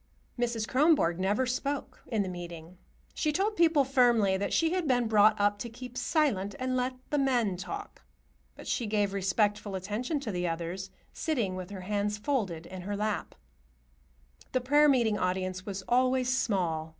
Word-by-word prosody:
Mrs. 235 -2 -1
Kronborg 265 - +3
never 205 +7 +1
spoke 275 +3 -3
in 200 -5 -1
meeting. 175 0 -9 0.3
She 305 - 0
told 400 +7 0
people 325 -5 +4
firmly 240 -7 +3
that 195 +1 -2
she 330 -1 +2
had 365 -3 -1
been 245 -3 +2
brought 215 -1 +5
up 205 0 +2
to 235 - -5
keep 250 +1 -10
silent 235 - 0
and 255 -1 -1
let 255 +1 -1 0.2
the 295 - +2
men 245 -8 +2
talk, 405 - -7 0.5
but - - -11
she 235 - -1
gave 205 -2 0
respectful 200 +1 0
attention 215 - -2
to 235 -6 -4
the 180 -1 -1
others, 170 +3 -4 0.2
sitting 235 - -1
with 185 0 -6
her 195 -2 -7
hands 205 +2 -1
folded 210 - -2
in 185 +1 -8
her 200 +3 -4
lap. 210 -1 -2 1.2
The 255 - +2
prayer 295 +4 +5
meeting 235 -6 +2
audience 185 +1 -2
was 195 -1 -4
always 255 +1 +2
small. 175 -10 0
215 Hz, 165 wpm, -29 LUFS, 190-255 Hz, 1.2 s, brought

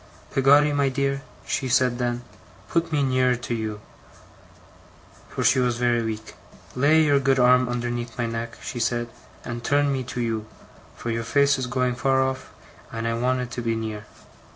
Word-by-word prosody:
"Peggotty, 145 +2 +5
my 140 -1 +2
dear," 140 +1 -1 0.2
she 130 - -1
said 125 -1 +2
then, 120 0 -1 0.5
"put 170 -1 0
me 145 -2 +2
nearer 130 -1 +2
to 120 0 -5
you," 110 -2 -3 1.5
for - - -3
she 130 +1 +4
was 125 -2 +1
very 120 -1 +2
weak. 110 -1 -5 0.4
"Lay 150 +5 +4
your 145 -2 +4
good 135 0 +2
arm 125 0 +5
underneath 120 -1 -3
my 120 - 0
neck," 115 0 -4
she 120 - -5
said, 120 0 0 0.4
"and 120 0 -5
turn 145 +2 +2
me 130 -1 -2
to 125 - -5
you, 110 -2 -2 0.5
for 120 - -4
your 115 0 -2
face 140 +3 +3
is 130 - -2
going 125 0 0
far 135 +2 +1
off, 130 0 -1 0.4
and 115 0 -3
I 115 - 0
want 125 +2 0
it 125 -1 -6
to 120 - -4
be 115 -1 0
near." 110 -1 -5
125 Hz, 180 wpm, -24 LUFS, 115-135 Hz, 1.5 s, Peggotty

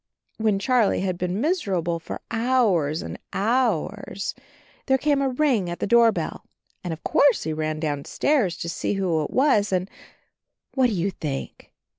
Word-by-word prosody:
When 215 -2 +2
Charlie 235 -1 +2
had 185 -1 -1
been 180 +2 -2
miserable 190 - 0
for 165 - -7
hours 225 - +1
and - - -7
hours 210 -3 0 0.5
there 265 -1 +4
came 285 +1 +1
a 270 - +1
ring 255 -9 +1
at 175 - -4
the - - -2
doorbell, 230 +1 +2 0.4
and 175 - -3
of 160 - -7
course 280 -5 +3
he 160 - -2
ran 155 0 -2
downstairs 165 - 0
to - - -5
see 170 - -2
who 175 -5 0
it - - -4
was 255 -7 +3
and 185 0 0 0.5
— - - -58
what 260 -2 +3
do 230 - -2
you 190 +1 0
think? 145 -6 -6
200 Hz, 165 wpm, -24 LUFS, 170-250 Hz, 0.5 s, there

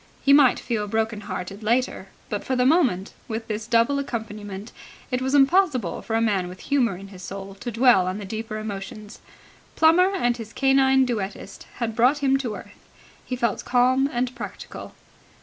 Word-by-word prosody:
He 280 - +6
might 280 -3 +6
feel 215 -4 -2
broken 220 0 -1
hearted 195 0 -6
later, 230 -2 0 0.2
but 205 -1 -4
for 260 - -1
the 250 0 +2
moment, 255 - +2
with 225 0 -5
this 215 0 -4
double 235 +4 +3
accompaniment, 215 -5 -6 0.4
it 250 0 0
was 265 +2 0
impossible 275 - +3
for 225 - -3
a - - +3
man 200 -5 +1
with 180 +1 -10
humour 245 -9 +1
in 195 +1 -11
his 185 -2 -12
soul 195 +1 -7
to 240 - -5
dwell 230 -5 +4
on 185 +2 -2
the 205 - -6
deeper 220 +2 -5
emotions. 210 0 -7 0.6
Plummer 345 +4 +5
and 245 -9 +1
his 225 -1 -9
canine 270 -1 +4
duettist 200 -4 -5
had 230 -2 -3
brought 250 +6 +4
him 270 -2 +2
to 245 -6 -4
earth. - - -12 0.4
He 255 - -4
felt 235 -4 -1
calm 255 +2 +3
and 245 +1 -1
practical. - - -8
230 Hz, 180 wpm, -24 LUFS, 205-260 Hz, 0.6 s, He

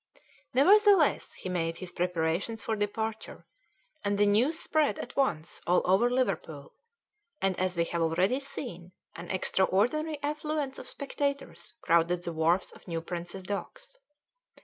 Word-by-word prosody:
Nevertheless, 390 - +5
he - - -8
made 165 -2 -1
his 185 -2 -7
preparations 175 +5 -1
for 220 - -1
departure, 220 +1 -4 0.6
and 205 0 0
the 205 - +4
news 235 +10 +3
spread 310 -3 +1
at - - -7
once 170 - -1
all 180 +1 +3
over 195 +7 +4
Liverpool, 195 - -2 0.7
and, 195 -5 +1
as 185 -1 -1
we 170 - +3
have 170 0 -2
already 180 +10 +2
seen, 240 -11 -6 0.2
an 170 +1 -8
extraordinary 220 - +1
affluence 300 -1 -2
of - - -9
spectators 280 - -4
crowded 170 +1 +2
the 170 - -4
wharfs 165 +3 +1
of - - -17
New 165 -2 -2
Prince's 175 +2 -6
Docks. - - -6
195 Hz, 140 wpm, -29 LUFS, 175-275 Hz, 0.7 s, Nevertheless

